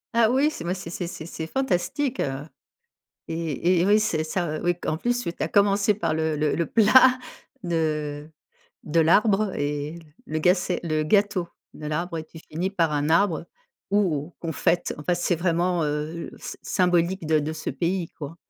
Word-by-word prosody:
Ah 230 -1 +5
oui, 275 +5 +3
c'est 170 - -7
moi, 175 +2 -1
c'est 175 -3 -7
c'est 175 -1 -4
c'est 160 - -7
c'est 160 -1 -6
fantastique, 265 - -1
heu, 135 0 -2 0.8
et 165 +2 0
et - - +3
oui, 210 +1 +5
c'est 175 -8 0
ça 155 -1 -2
oui, 175 0 +1
q - - -8
en 155 - +1
plus, 245 +6 0
tu 170 - -2
tu - - -7
as - - 0
commencé 200 0 +3
par 190 -6 -1
le 160 -1 0
le 150 0 +1
le 170 - 0
plat 255 +4 +6 0.5
de 155 -3 -2 0.5
de 165 +2 +2
l'arbre 200 +4 +3
et 145 +3 -3 0.3
le 155 - -2
ga 180 +4 +5
c'est 180 -1 -2
le 155 -2 0
gâteau 200 +1 +2 0.3
de 150 - -6
l'arbre 165 +2 -2
et 155 - -5
tu 160 - -13
finis 170 +4 -4
par 165 -6 +1
un 145 +1 0
arbre 170 -1 +2 0.4
où 175 -6 +1
on 165 - -2
fête, 170 +3 0
enfin, 150 +4 0
c'est 175 +1 0
vraiment, 170 0 +1
heu, 150 +3 -3
s - - -7
symbolique 180 -1 +1
de 155 0 +3
de 150 +2 -3
ce 160 - -4
pays, 175 0 -2
quoi. 155 +2 -8
170 Hz, 190 wpm, -25 LUFS, 155-190 Hz, 0.8 s, plat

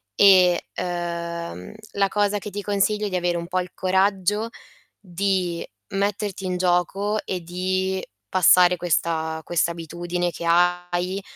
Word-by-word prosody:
e, 185 -3 +6 0.2
uhm, 170 - -4 0.2
la 200 -1 +2
cosa 205 +1 +1
che 210 - -7
ti 205 +1 -4
consiglio 210 +1 +1
è - - -4
di 185 - -3
avere 175 -1 0
un 170 0 -5
po' 185 0 0
il 180 0 -5
coraggio 195 +3 +1 0.5
di 185 -2 -1 0.3
metterti 200 -1 -2
in 180 -1 -1
gioco 185 +4 +1
e 180 -2 -3
di 185 +2 -2 0.2
passare 180 0 +5
questa 160 -2 -1
questa 170 0 +1
abitudine 175 +1 -3
che 170 - -7
hai, 175 +2 +1
180 Hz, 135 wpm, -23 LUFS, 175-195 Hz, 0.5 s, e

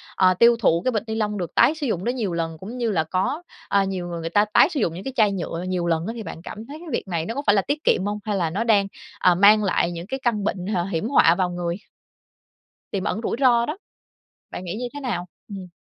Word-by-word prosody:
ờ, 185 -1 +4
tiêu 235 +6 +5
thụ 170 -6 +3
cái 255 - +2
bịch 215 -4 -1
ni 220 - -3
lông 210 -2 -1
được 175 -4 -5
tái 255 +7 +5
sử 300 -3 -3
dụng 185 -6 -2
đó - - +1
nhiều 230 -8 -2
lần, 165 -1 -3
cũng 210 +9 -8
như 235 -3 0
là 165 -5 +1
có, 190 - -1 0.3
à, 200 0 +3
nhiều 190 -2 -3
người 170 -1 -5
người 165 0 -4
ta 205 +5 +3
tái - - +6
sử 315 -6 -3
dụng 165 - 0
những 180 +3 -7
cái 265 - -5
chai 215 -3 +4
nhựa 175 -2 -4
nhiều 180 -2 -1
lần 165 +1 0
á 225 - -3
thì 230 - -6
bạn 165 -3 -8
cảm 215 +5 -8
thấy 290 - -8
cái 345 - -11
việc 235 - -2
này 170 -3 -2
nó 230 - -4
có 280 - -2
phải 205 - +4
là 200 - +4
tiết 295 +8 -3
kiệm 185 - +2
hông, 205 +1 -2
hay 210 -2 -2
là 170 -3 0
nó 195 +8 -1
đang, 210 -4 +3 0.3
ờ, 180 -1 +4
mang 210 +3 +6
lại 185 -3 +1
những 170 +1 -7
cái 265 +4 -4
căn 220 -4 0
bệnh, 190 -3 -2
h 205 -2 -1
hiểm 170 +6 -1
họa 170 -11 +5
vào 180 0 0
người? 175 -1 -3 1.2
Tiềm 195 -2 -2
ẩn - - -2
rủi - - -1
ro 240 -3 +4
đó. 305 +7 -4 0.7
Bạn - - -6
nghĩ 175 - -4
như 245 +3 -3
thế 290 - -6
nào? 230 -11 -3 0.2
Ừm. 195 -3 -8
200 Hz, 280 wpm, -23 LUFS, 175-235 Hz, 1.2 s, tái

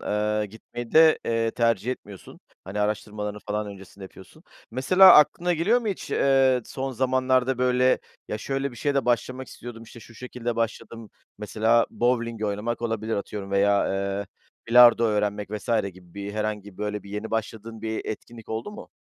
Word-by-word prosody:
eee, 105 0 -1
gitmeyi 115 +3 -9
de, 160 0 +6
eee, 115 0 0
tercih 115 -1 0
etmiyorsun. 100 -6 -12 0.2
Hani, 100 +3 -4
araştırmalarını 105 0 -3
falan 105 0 -2
öncesinde 100 -1 -11
yapıyorsun. 95 - -15 0.3
Mesela 185 +10 +7
aklına 175 +4 +4
geliyor 190 +9 +2
mu 225 - -3
hiç, 195 - -5
eee, 135 -2 +3
son 135 +2 -5
zamanlarda, 130 0 +1
böyle, 125 0 +3 0.3
"Ya, 105 - -3
şöyle 135 +4 -2
bir 120 - -13
şeye 145 +5 -1
de 140 -3 +1
başlamak 130 +2 -1
istiyordum, 120 -1 -10
işte 115 +1 -13
şu 115 - -15
şekilde 120 -1 -5
başladım." 115 -1 -4 0.3
mesela 110 +2 +2
bovling 115 -2 -1
oynamak 105 +4 -3
olabilir, 115 -1 -2
atıyorum 100 -1 -6
veya, 100 +1 +2
eee, 100 +1 -2 0.4
bilardo 120 0 +7
öğrenmek 105 -2 -1
vs. 105 +1 -6 0.2
gibi 90 -1 -18
bir 100 0 -6
herhangi 105 -1 -3
bir, 90 - -23
böyle, 105 -1 -3
bir 100 - -13
yeni 105 +2 -5
başladığın 110 0 -4
bir 110 0 -3
etkinlik 115 +1 -8
oldu 110 - -4
mu? 210 - -10
115 Hz, 165 wpm, -25 LUFS, 105-125 Hz, 0.4 s, Mesela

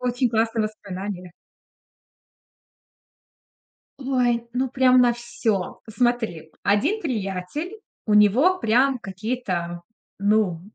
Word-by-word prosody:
очень 250 0 0
классные 225 0 +1
воспоминания. 195 -3 -6 2.7
Ой, 250 -3 0
ну 260 +1 0
прям 255 0 +4
на 245 -1 +5
всё. 235 -5 -3
Смотри, 225 -9 -1
1 260 - +2
приятель, 250 - -4 0.3
у 210 - +2
него 245 - +5
прям 255 +1 +2
какие-то, 190 -5 -4 0.4
ну 200 -4 +2
225 Hz, 90 wpm, -23 LUFS, 200-255 Hz, 2.7 s, на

